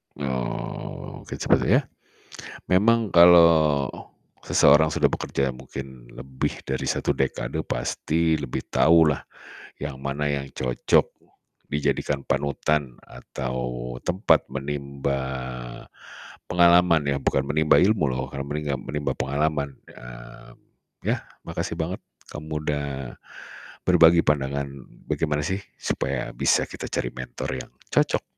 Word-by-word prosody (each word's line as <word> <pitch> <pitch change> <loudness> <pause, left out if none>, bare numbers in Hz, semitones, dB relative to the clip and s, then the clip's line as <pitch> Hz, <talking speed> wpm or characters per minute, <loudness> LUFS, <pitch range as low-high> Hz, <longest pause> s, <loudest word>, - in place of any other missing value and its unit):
Oh, 65 -3 -5
sepertinya, - - +2 0.9
memang 110 +4 +3
kalau 85 -5 +6 0.6
seseorang 80 0 +5
sudah - - +3
bekerja 65 -2 -2
mungkin 65 -1 -9
lebih 65 -1 -4
dari 65 0 -2
1 - - 0
dekade 65 -1 -2
pasti 80 0 0
lebih 70 -4 -4
tahu 80 0 +5
lah, - - -9 0.6
yang 70 -2 -6
mana 70 +2 -2
yang 70 -1 -3
cocok 60 -1 +1 0.6
dijadikan 70 -1 -1
panutan 70 -2 0
atau 60 -1 -5
tempat 90 +4 +2
menimba 70 0 -3 1.3
pengalaman 85 -1 +5
ya, 70 -1 +1
bukan 70 - +1
menimba 75 +2 +3
ilmu 105 0 +3
loh 65 0 -2
kala 70 - -3
meningga 75 -1 -2
menimba 75 +3 -3
pengalaman, 70 +2 -1
ya. - - -12 0.5
Yah, - - 0 0.2
makasih - - -4
banget, 85 +4 -3 0.3
kamu 75 0 -5
udah 75 -1 -1 1.0
berbagi 85 +1 +6
pandangan, 70 -1 0 0.4
bagaimana 75 -2 -1
sih 95 +5 -2 0.2
supaya - - -3
bisa - - +2
kita - - -8
cari 60 - -2
mentor 65 0 -6
yang 65 - -7 0.2
cocok - - +2
70 Hz, 110 wpm, -24 LUFS, 65-80 Hz, 1.3 s, kalau